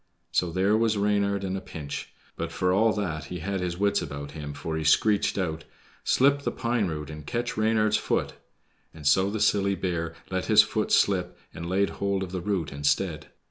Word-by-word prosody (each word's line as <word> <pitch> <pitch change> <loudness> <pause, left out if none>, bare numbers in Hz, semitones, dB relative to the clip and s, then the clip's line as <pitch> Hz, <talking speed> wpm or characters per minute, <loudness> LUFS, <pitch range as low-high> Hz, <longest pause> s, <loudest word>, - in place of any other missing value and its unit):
So 90 -2 +1
there 95 +4 +2
was 110 -1 +2
Reynard 100 -1 +1
in 95 0 -2
a 95 - -4
pinch; 75 -3 -7 0.2
but 85 0 -4
for 90 +2 +1
all 110 +4 +4
that 85 -7 -3
he 90 - -6
had 95 +3 -3
his 90 -1 -3
wits 100 +1 +2
about 70 0 -6
him, 75 -2 -6
for 80 +2 -4
he 80 - -2
screeched 100 +8 +3
out, 80 -4 -2 0.4
"SLIP 140 +2 +3
THE - - -1
PINE 115 -4 0
ROOT 75 -2 -5
AND 75 -1 -9
CATCH 120 +1 -2
REYNARD'S 110 -1 +2
FOOT," - - -1 0.6
and 75 -2 -11
so 95 +7 +4
the 110 +1 -3
silly 100 -1 +2
bear 85 -3 -2 0.2
let - - -1
his - - +7
foot - - -2
slip - - +2 0.2
and 85 +1 -6
laid 100 +2 +1
hold 100 -1 -1
of 90 - -6
the 95 -1 -3
root 90 -5 -1
instead. 70 +4 0
95 Hz, 200 wpm, -27 LUFS, 80-105 Hz, 0.6 s, his